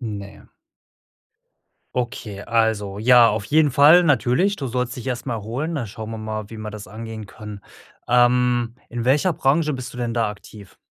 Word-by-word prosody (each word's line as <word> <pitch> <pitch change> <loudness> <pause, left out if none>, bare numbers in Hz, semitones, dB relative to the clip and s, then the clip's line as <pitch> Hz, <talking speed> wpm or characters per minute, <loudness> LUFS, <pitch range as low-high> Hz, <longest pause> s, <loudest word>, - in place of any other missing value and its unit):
Ne. 100 -4 -7 1.5
Okay, 115 -5 -4
also 110 -3 0
ja, 120 +1 +6
auf 105 0 -2
jeden 150 +4 +3
Fall 150 +7 +7
natürlich. 145 - +2
Du 135 - -4
sollst 125 0 -2
dich 125 - -8
erst 125 0 -3
mal 120 - -2
erholen, 125 +10 -4
da 120 - -3
schauen 110 +2 -8
wir 110 - -6
mal, 110 -1 -5
wie 115 - -8
man 110 -1 -7
das 105 -3 -9
angehen 110 0 -8
kann. 105 0 -10 0.5
Ähm, 120 -1 +3
in 120 0 -4
welcher 145 +7 +3
Branche 150 +2 +1
bist 130 0 -7
du 125 - -8
denn 120 -1 -2
da 115 -2 0
aktiv? 105 -1 -12
120 Hz, 175 wpm, -22 LUFS, 110-130 Hz, 1.5 s, Fall